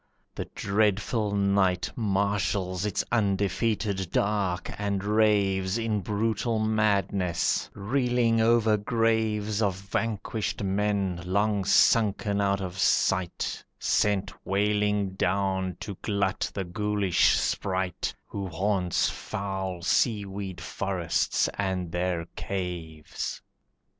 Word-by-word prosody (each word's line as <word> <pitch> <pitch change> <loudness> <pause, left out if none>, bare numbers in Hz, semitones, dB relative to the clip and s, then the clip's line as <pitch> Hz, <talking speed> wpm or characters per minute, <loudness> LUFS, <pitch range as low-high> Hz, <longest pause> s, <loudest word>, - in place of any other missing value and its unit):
The - - -4
dreadful 105 +1 +1
night 100 -2 +2
Marshals 100 -2 0
its 100 - -1
undefeated 100 -2 0
dark 100 -3 0
and 100 -2 -1
raves 100 -2 +2
In 110 -2 0
brutal 110 +4 0
madness, 100 -4 +1
reeling 120 0 +1
over 110 -1 +4
graves 110 -1 0
Of 100 -4 +1
vanquished 105 +1 -3
men, 100 -2 0
long 100 +2 +1
sunken 100 0 +3
out 100 0 +1
of 95 0 -5
sight, 95 -2 +1
Sent 100 -2 +1
wailing 105 0 +1
down 95 -1 0
to 100 - -5
glut 100 -1 0
the 100 - -3
ghoulish 100 0 +2
sprite 95 -2 -1
Who 100 -1 -5
haunts 95 0 +1
foul 95 -3 -4
seaweed 100 -2 0
forests 95 -1 0
and 95 -4 -1
their 90 -1 -1
caves. 85 -5 -4
100 Hz, 100 wpm, -27 LUFS, 95-105 Hz, -, over